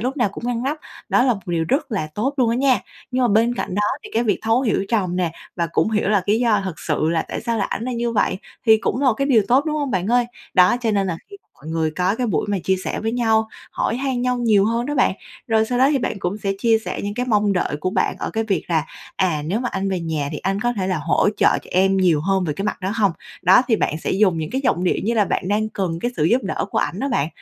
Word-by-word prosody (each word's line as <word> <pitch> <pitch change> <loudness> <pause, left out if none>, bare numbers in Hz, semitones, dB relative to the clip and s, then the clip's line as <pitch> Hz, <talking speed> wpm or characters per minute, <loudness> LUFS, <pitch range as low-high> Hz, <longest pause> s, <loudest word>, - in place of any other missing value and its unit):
lúc 255 +5 -2
nào 240 -6 +2
cũng 205 - -9
ngăn 245 -1 -1
nắp 290 +4 -2 0.3
đó - - +3
là 250 -2 +3
một 200 - -8
điều 170 -2 0
rất 270 -2 0
là 190 -7 -2
tốt 260 +7 -1
luôn 245 -4 +2
á 235 - 0
nha. 265 -1 +3 0.3
Nhưng 255 0 0
mà - - +3
bên 230 +3 +3
cạnh 185 - -4
đó 205 - +1 0.2
thì - - -9
cái 230 +2 +2
việc 205 -4 +1
thấu 225 +2 +2
hiểu 215 -5 +1
chồng 185 -6 0
nè, 175 -3 0 0.2
và 170 - 0
cũng - - +2
hiểu 210 -2 0
là 205 -3 +3
lý 210 +2 +3
do 215 -5 +2
thực 180 -5 -5
sự 155 - 0
là 165 -1 +1
tại - - -4
sao 230 -1 -2
lại - - -1
ảnh - - -3
là 255 - -3
như 235 0 -1
vậy 195 -3 +1 0.3
thì 220 -1 +7
cũng 240 - -1
một 260 -5 +3
cái 275 +4 -1
điều 240 -6 +4
tốt, 260 +4 +4
đúng 305 -1 -1
hông, 285 -3 -2
bạn 185 -2 -1
ơi? 245 +1 +2 0.3
Đó, 180 +4 +5
cho 230 -2 0
nên 200 -2 +1
là 170 - -2
khi 400 - -9 0.2
mọi 145 - -16
người 160 -1 0
có 180 +5 0
cái 250 - -1
buổi 215 - 0
mà 200 - 0
chia 190 - +2
sẻ - - -3
với 225 +1 -2
nhau, 220 -2 +2 0.2
hỏi 230 - -1
han 265 -1 -1
nhau 250 0 +1
nhiều 215 -5 +3
hơn 230 +2 0
đó 295 - -2
bạn. 255 -8 +2 0.3
Rồi 220 -1 +3
sau 245 +1 -1
đó 265 +2 +5
thì 280 - +2
bạn 225 - -3
cũng 190 +2 -3
sẽ 200 -1 -1
chia 225 +1 +3
sẻ - - -4
những 205 0 -3
cái 250 +3 -2
mong 210 -3 +2
đợi 180 -5 -1
của 185 - -1
bạn 190 -1 0
ở - - -3
cái 225 0 -1
việc 200 -4 -1
là 160 -3 +1 0.3
"À, 175 -6 +1
nếu 205 +8 -1
mà 245 - -1
anh 195 0 -1
về 185 -2 -1
nhà 160 -4 -2
thì - - -4
anh 195 +1 -2
có 240 +1 +1
thể 190 -5 -2
là 185 -4 0
hỗ 160 +6 +2
trợ - - +3
cho - - -17
em 190 +1 +3
nhiều 175 -5 +3
hơn 190 +3 +1
về 155 - -1
cái 195 - -4
mặt 210 - -2
đó 190 +2 -2
hông?" 200 -6 +2 0.3
Đó, 185 +7 +6
thì 225 - +4
bạn 155 -6 -1
sẽ - - -3
dùng 190 -4 +2
những 155 -1 -4
cái 265 - -1
giọng 180 -6 +1
điệu - - +2
như 230 +3 +1
là 210 -3 +3
bạn 185 - -2
đang 215 +1 +1
cần 180 -6 -3
cái 240 - -1
sự 150 - +1
giúp 240 +10 +3
đỡ - - -2
của - - 0
ảnh - - -2
đó 275 - -1
bạn. 145 - 0
210 Hz, 300 wpm, -21 LUFS, 185-240 Hz, 0.3 s, thì